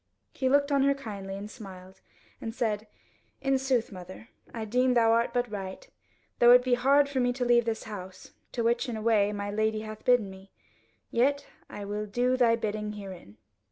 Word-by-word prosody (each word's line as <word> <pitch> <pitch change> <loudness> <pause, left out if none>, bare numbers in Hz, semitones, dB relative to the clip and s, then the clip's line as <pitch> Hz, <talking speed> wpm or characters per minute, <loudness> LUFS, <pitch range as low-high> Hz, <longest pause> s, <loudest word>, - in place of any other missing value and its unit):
He 260 - 0
looked 285 +1 +3
on 280 -1 +3
her 280 +1 +3
kindly, 200 -7 -7
and 200 +1 -6
smiled, 190 -4 -12 0.4
and 225 0 -5
said, 215 -3 -1 0.5
"In 270 0 +1
sooth, 260 -4 0
mother, 185 +4 -10 0.2
I 225 -2 -5
deem 250 +3 +2
thou 225 -1 +4
art 230 +1 +2
but 245 -2 -1
right; 195 - -6 0.5
though 240 - +7
it 250 0 +6
be 255 -1 +1
hard 275 +4 +4
for 280 -2 -2
me 245 -1 +2
to 250 0 -2
leave 240 -1 +4
this 225 -1 -2
house, 190 -3 -9 0.2
to 235 - -1
which 235 +2 +1
in 230 - -3
a - - -5
way 210 -3 +3
my 205 0 -4
Lady 215 +1 0
hath 215 0 -8
bidden 245 -6 +3
me. 190 +1 -14 0.6
Yet 280 +4 +1 0.2
I 205 - -7
will 210 +1 -4
do 245 +5 +1
thy 240 -3 +4
bidding 210 -1 -3
herein." 190 - -10
225 Hz, 195 wpm, -28 LUFS, 205-250 Hz, 0.6 s, though